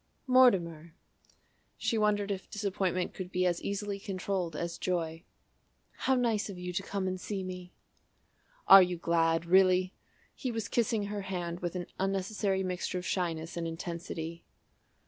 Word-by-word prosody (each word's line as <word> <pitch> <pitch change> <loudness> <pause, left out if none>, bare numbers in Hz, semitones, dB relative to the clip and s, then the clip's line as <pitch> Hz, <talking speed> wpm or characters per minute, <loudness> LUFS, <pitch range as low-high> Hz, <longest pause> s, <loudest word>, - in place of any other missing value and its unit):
"Mortimer!" 175 - +3 0.8
She - - 0
wondered 210 -2 +2
if 195 -1 -5
disappointment 190 -3 -1
could 185 -1 -6
be 185 0 +1
as 175 -1 +1
easily 200 0 -3
controlled 190 -3 -3
as 170 0 -4
joy. 165 -2 -2 0.7
"How 265 - +1
nice 230 -5 +1
of 195 - -7
you 180 0 -5
to 190 - 0
come 195 -1 -3
and 185 0 -3
see 200 -3 -3
me!" 180 -1 -7 1.0
"Are 195 - +11
you 180 -1 +1
glad 165 -1 +2
really?" 185 +1 +4 0.4
He 260 - -4
was 225 -2 -3
kissing 230 -3 +1
her 205 0 -3
hand 175 -3 -4
with 175 0 -3
an 180 -1 -3
unnecessary 195 0 0
mixture 180 0 -2
of 180 - -5
shyness 165 -3 -2
and 170 -1 -2
intensity. 170 0 -5
185 Hz, 150 wpm, -31 LUFS, 170-200 Hz, 1.0 s, Are